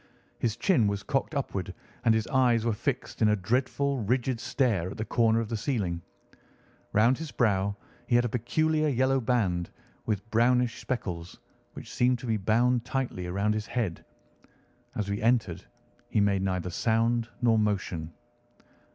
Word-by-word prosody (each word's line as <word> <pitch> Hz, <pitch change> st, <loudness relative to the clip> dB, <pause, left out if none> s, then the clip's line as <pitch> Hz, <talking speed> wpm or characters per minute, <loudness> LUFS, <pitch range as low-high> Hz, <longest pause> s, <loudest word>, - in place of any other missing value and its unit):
His 115 Hz, -3 st, 0 dB
chin 150 Hz, -, +3 dB
was 100 Hz, -1 st, -2 dB
cocked 135 Hz, +6 st, -1 dB
upward 100 Hz, -10 st, -3 dB, 0.3 s
and 115 Hz, -1 st, +5 dB
his 110 Hz, -1 st, 0 dB
eyes 120 Hz, -4 st, +2 dB
were 115 Hz, -, +2 dB
fixed 125 Hz, +4 st, -3 dB
in 110 Hz, -, +5 dB
a 105 Hz, -, +4 dB
dreadful, 130 Hz, +6 st, 0 dB
rigid 120 Hz, +2 st, 0 dB
stare 115 Hz, -, 0 dB
at 100 Hz, -, -8 dB
the 110 Hz, -, -3 dB
corner 115 Hz, -1 st, +2 dB
of 115 Hz, -, -2 dB
the 115 Hz, -, -2 dB
ceiling. 105 Hz, -7 st, -2 dB, 0.9 s
Round 115 Hz, +5 st, +4 dB
his 160 Hz, -1 st, -5 dB
brow 100 Hz, -6 st, +1 dB, 0.3 s
he 120 Hz, -, +2 dB
had 120 Hz, 0 st, +4 dB
a 120 Hz, -, -2 dB
peculiar 155 Hz, +6 st, +1 dB
yellow 135 Hz, 0 st, +2 dB
band, 100 Hz, -8 st, 0 dB, 0.4 s
with 105 Hz, -1 st, -2 dB
brownish 120 Hz, +1 st, +2 dB
speckles, 90 Hz, -9 st, -4 dB, 0.3 s
which -, -, -9 dB
seemed 125 Hz, 0 st, +2 dB
to 120 Hz, -, -9 dB
be 110 Hz, -2 st, +1 dB
bound 115 Hz, +4 st, +2 dB
tightly 125 Hz, -9 st, -3 dB
round 100 Hz, +4 st, +1 dB
his 110 Hz, 0 st, -3 dB
head. 110 Hz, -9 st, -2 dB, 0.9 s
As 105 Hz, -2 st, -2 dB
we 100 Hz, 0 st, -2 dB
entered 110 Hz, -7 st, +1 dB, 0.5 s
he 110 Hz, -, +1 dB
made 100 Hz, -1 st, +2 dB
neither 90 Hz, -2 st, -1 dB
sound 115 Hz, +4 st, +1 dB
nor 115 Hz, -2 st, +3 dB
motion. 95 Hz, -6 st, -1 dB
115 Hz, 160 wpm, -28 LUFS, 100-125 Hz, 0.9 s, and